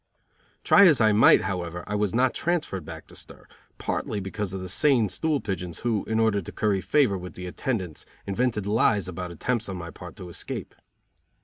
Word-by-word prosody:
Try 200 - +7
as 155 -5 +5
I 110 -2 +5
might, 105 +2 +6
however, 90 -2 -4
I 105 - -5
was 105 -2 0
not 130 +1 +3
transferred 160 - -1
back - - -9
to - - -15
stir, - - -10 0.3
partly 105 - -2
because 95 0 -4
of 95 - -4
the 95 - -6
sane 120 - +3
stool 155 - 0
pigeons 90 -6 -5
who, 115 -4 0
in 110 0 0
order 110 -3 +2
to 85 - -8
curry 100 -3 0
favor 130 -9 +2
with 90 0 -9
the 90 - -7
attendants, 95 - -3 0.2
invented 105 0 -1
lies 105 -2 +2
about 90 0 -5
attempts 110 +6 -2
on 95 - -4
my 85 -1 -7
part 90 -2 -11
to 95 -4 -9
escape. 85 - -5
100 Hz, 195 wpm, -26 LUFS, 90-115 Hz, 0.3 s, Try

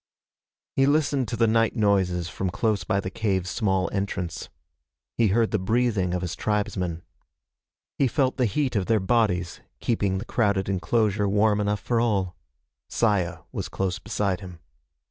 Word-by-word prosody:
He 135 0 +4
listened 140 -3 +2
to 110 - -3
the 115 0 +3
night 115 0 +2
noises 95 -5 +1
from 95 +2 -3
close 105 +2 0
by 100 - 0
the 95 - -5
cave's 95 -3 -1
small 95 -5 +1
entrance. 95 -3 -3 0.7
He 115 - +3
heard 110 +3 +2
the 110 - +1
breathing 100 -3 +1
of 90 - -2
his 90 - -3
tribesmen. 95 -5 -2 1.0
He 135 - +4
felt 130 +1 0
the 125 - +2
heat 130 +3 -1
of 100 -3 0
their 115 -1 +3
bodies, 95 -5 0 0.2
keeping 100 -5 0
the 95 - -5
crowded 100 -6 +1
enclosure 100 +1 +1
warm 105 +1 +3
enough 105 0 -1
for 120 -2 0
all. 100 -6 0 0.5
Saya 95 -7 +1
was - - -4
close 95 -2 -2
beside 100 -3 -1
him. 90 -3 -10
100 Hz, 160 wpm, -25 LUFS, 95-115 Hz, 1.0 s, He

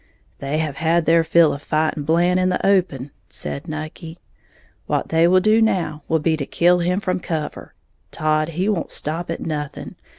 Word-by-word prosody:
"They 140 +2 -2
have 155 -3 -2
had 165 +1 +1
their 165 0 +4
fill 165 -1 +4
of 140 - -7
fighting 155 -1 -1
Blant 175 +3 +2
in 185 0 +2
the 180 - -1
open," 175 -9 +1 0.2
said 70 -1 -6
Nucky; 155 +2 -7 0.7
"what - - -1
they 165 +1 +4
will 185 +1 +4
do 215 +3 +4
now 170 -8 0
will 160 - +2
be 160 +1 +1
to 140 - -3
kill 175 +1 +3
him 180 +2 0
from 185 -3 -2
cover. 155 -4 -5 0.3
Todd 155 0 0
he 185 +3 0
won't 200 -6 -1
stop 165 +3 -4
at 165 - -4
nothing. 150 -3 -5
165 Hz, 185 wpm, -21 LUFS, 155-180 Hz, 0.7 s, their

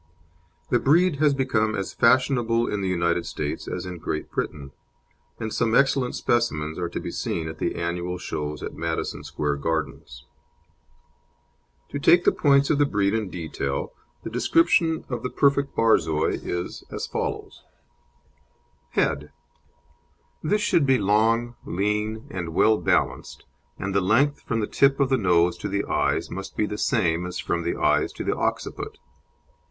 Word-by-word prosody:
The 120 - +4
breed 160 +5 +3
has 145 -1 +3
become 110 -5 +1
as 95 -2 -4
fashionable 120 -1 +3
in 105 - -2
the 95 - -1
United 85 -1 +1
States 75 -1 -4
as - - -4
in 90 -2 -6
Great 75 0 -4
Britain, 70 -2 -4 0.7
and 110 -1 -4
some 115 0 +1
excellent 135 -2 +2
specimens 80 -10 0
are 85 -1 -2
to - - -4
be - - -5
seen 80 -2 -3
at 80 - -7
the - - -1
annual 85 +1 -3
shows 75 -3 -5
at - - -5
Madison - - -3
Square 75 -1 -2
Gardens. 75 -5 -4 1.6
To 145 - -4
take 175 +4 +5
the - - +5
points 140 -1 +3
of 145 - +2
the 145 - +5
breed 100 -4 +1
in 110 -3 -1
detail, 80 -6 -4 0.3
the - - -6
description 160 - +2
of 125 -3 -4
the 125 - -3
perfect 140 0 +2
Borzoi 80 -9 +2
is 85 0 -4
as - - -4
follows: - - -4 1.3
HEAD 75 +1 0 1.1
This 210 +7 +1
should 165 -7 +2
be 130 -1 +5
long, 115 +3 +2
lean, 105 +3 -2
and 85 -3 -5
well 110 +2 +4
balanced, 85 - -1 0.3
and 95 +1 -3
the 100 - +2
length, 130 +10 +2
from 115 -1 -2
the - - 0
tip 135 +5 +3
of 140 -2 +2
the 135 - +3
nose 90 -3 +3
to - - -3
the 100 +1 -1
eyes, - - 0
must 95 +1 -7
be 105 - +2
the 105 0 -5
same 90 -8 +1
as 90 - -5
from 85 - -1
the 85 - -2
eyes - - +2
to - - -5
the - - 0
occiput. - - -3
105 Hz, 160 wpm, -24 LUFS, 85-130 Hz, 1.6 s, take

